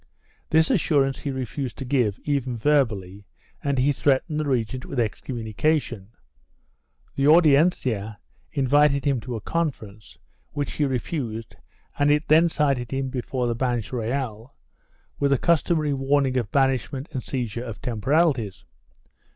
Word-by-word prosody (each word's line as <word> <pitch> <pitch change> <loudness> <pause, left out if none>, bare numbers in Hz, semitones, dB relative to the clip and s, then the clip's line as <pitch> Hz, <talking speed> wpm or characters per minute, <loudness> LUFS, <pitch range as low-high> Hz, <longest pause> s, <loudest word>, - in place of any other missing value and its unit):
This 160 +5 +3
assurance 145 - +2
he 145 - -4
refused 130 0 -4
to 135 - -6
give, 125 -6 +1
even 135 -4 -1
verbally, 105 -8 0 0.4
and 140 -1 0
he 130 +3 +3
threat 135 -1 +1
ened 155 -2 -3
the 155 - -1
regent 125 0 -1
with 135 - -4
excommunication. 115 0 -2 1.1
The 140 +1 +2
Audiencia 140 - +3 0.3
invited 140 0 +3
him 140 -3 +2
to 120 +1 -6
a 110 - -5
conference, 110 - -4 0.4
which 145 -1 -2
he 150 - 0
refused 125 -4 -3 0.4
and 145 0 +3
it 150 +2 +2
then 165 +3 +5
cited 140 -6 0
him 135 +1 -2
before 125 0 -2
the 120 - 0
Banch 120 -3 -1
Reyal, 120 0 -3 0.6
with 140 - +2
the 140 - +3
customary 155 -1 +1
warning 135 -1 +1
of 120 -5 -1
banish 135 -5 +1
ment 135 +2 -5
and 130 - -3
seizure 120 -3 -4
of 115 -4 -7
temporalities. 125 - 0
135 Hz, 145 wpm, -24 LUFS, 115-145 Hz, 1.1 s, then